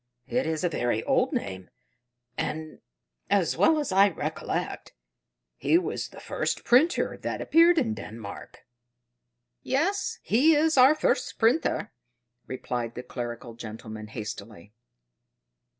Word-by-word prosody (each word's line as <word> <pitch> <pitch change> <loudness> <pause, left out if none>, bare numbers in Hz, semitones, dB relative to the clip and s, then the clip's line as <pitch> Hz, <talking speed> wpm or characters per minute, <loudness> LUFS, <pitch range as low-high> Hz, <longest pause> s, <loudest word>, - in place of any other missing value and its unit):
"It 255 - -1
is 160 0 -2
a 175 - +2
very 120 -7 -1
old - - +2
name, 95 -2 -4 0.7
and, 155 0 -4 0.5
as 195 -4 +2
well 320 -1 +4
as 295 -8 -2
I 195 +2 +6
recollect, - - -4 0.6
he 330 - +3
was 360 - -2
the - - -13
first - - -2
printer 285 +9 +3
that - - -4
appeared 335 +2 +5
in 235 -8 +1
Denmark." 110 - -9 1.0
"Yes, 345 +10 0
he 300 +8 +4
is 315 +2 +3
our 265 +3 +7
first - - 0
printer," 230 -2 +1 0.5
replied 120 -2 -4
the 125 - -6
clerical 120 -1 -6
gentleman 110 -1 -8
hastily. 105 -2 -8
160 Hz, 120 wpm, -27 LUFS, -, 1.0 s, our